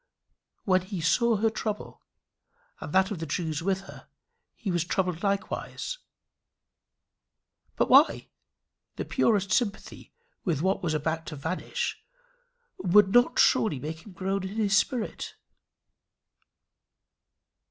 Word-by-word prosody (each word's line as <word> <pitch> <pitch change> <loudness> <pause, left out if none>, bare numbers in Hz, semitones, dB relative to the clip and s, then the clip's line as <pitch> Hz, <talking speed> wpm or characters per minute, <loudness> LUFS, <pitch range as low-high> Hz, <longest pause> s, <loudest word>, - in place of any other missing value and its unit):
When 185 -1 +3
he 185 0 -6
saw 230 +8 +3
her 220 +2 +1
trouble, 215 -1 -5 0.8
and - - -7
that 190 +3 +3
of 195 - -4
the 165 - -4
Jews 160 0 -2
with 190 +2 0
her, 195 - -13 0.5
he 200 - -4
was 175 -2 +1
troubled 180 -1 -1
likewise. 200 - -3 1.8
But - - +2
why? - - +5 0.7
The - - -4
purest 200 -3 +1
sympathy 220 -4 -2 0.3
with 165 -5 -1
what 190 +1 +1
was 160 -3 -1
about 160 +2 -2
to 155 - -5
vanish 160 +6 -3 0.8
would 190 +2 +5
not 245 0 +4
surely 185 -10 +4
make 160 +4 -6
him 205 - -13
groan 195 +2 -2
in 190 +2 -6
his 205 -3 +2
spirit. 230 +2 -1
190 Hz, 120 wpm, -27 LUFS, 165-210 Hz, 1.8 s, why